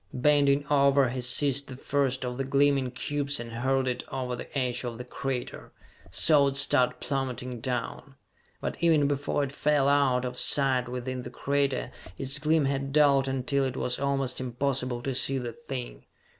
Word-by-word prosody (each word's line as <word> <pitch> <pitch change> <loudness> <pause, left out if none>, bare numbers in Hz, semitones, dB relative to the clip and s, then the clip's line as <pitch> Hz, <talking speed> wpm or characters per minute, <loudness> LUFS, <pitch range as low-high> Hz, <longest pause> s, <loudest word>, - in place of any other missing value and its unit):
Bending 145 +1 +3
over 140 -2 +3
he 125 +1 -4
seized 140 +2 +2
the 130 - -9
first 135 -2 -1
of 125 +1 -5
the - - 0
gleaming 140 -1 +2
cubes 140 +2 -1
and 120 -1 -7
hurled 130 +3 0
it 125 -1 -2
over 125 -2 -3
the 120 - -7
edge 125 -2 -1
of 120 -2 -5
the 125 - -6
crater, 130 0 -5 0.4
saw 145 - +4
it 135 0 -2
start 125 -2 +2
plummeting 130 -3 -3
down. 125 +2 -4 0.4
But - - -4
even 160 -4 +4
before 145 0 -1
it 135 - -3
fell 145 -1 +1
out 135 -3 +2
of 125 0 -4
sight 130 -3 +3
within 125 +1 -4
the 120 - -8
crater 140 -1 -1 0.3
its 135 +1 -2
gleam 155 0 +2
had 135 0 -2
dulled 140 -2 +4
until 135 +1 0
it 130 -1 -3
was 125 - -1
almost 135 -2 -1
impossible 125 -1 -2
to 135 - -2
see 135 +2 +1
the 120 -2 -4
thing. 135 -3 -7
135 Hz, 175 wpm, -27 LUFS, 125-140 Hz, 0.4 s, saw